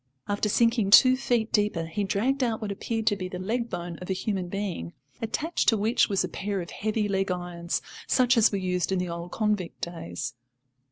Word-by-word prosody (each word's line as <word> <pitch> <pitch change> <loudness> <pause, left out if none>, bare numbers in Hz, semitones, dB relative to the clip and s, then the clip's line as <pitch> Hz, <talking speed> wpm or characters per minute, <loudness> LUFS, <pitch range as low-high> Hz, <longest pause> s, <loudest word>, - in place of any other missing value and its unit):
After 205 +1 0
sinking 230 -1 +3
two 255 +5 +8
feet 240 -3 0
deeper 205 -6 +1
he 165 +6 -2
dragged 250 +8 +1
out 230 -3 0
what 215 -2 -4
appeared 225 +2 -3
to 205 - +3
be 185 -2 -4
the 185 - -5
leg 230 +6 -2
bone 175 -2 -5
of 180 - -9
a - - +2
human 190 -1 -2
being, 180 - -4 0.3
attached 305 +9 0
to 225 - +3
which 220 +4 +2
was 195 -2 +1
a - - -1
pair 200 0 -3
of 170 -1 -6
heavy 215 0 -1
leg 195 -1 0
irons, 175 -1 -3 0.2
such 255 0 +4
as 230 -1 +5
were 200 - 0
used 180 -2 -1
in 190 - +2
the 180 -1 -2
old 170 +1 -5
convict 210 -5 -1
days. 120 - -5
200 Hz, 210 wpm, -27 LUFS, 180-225 Hz, 0.3 s, two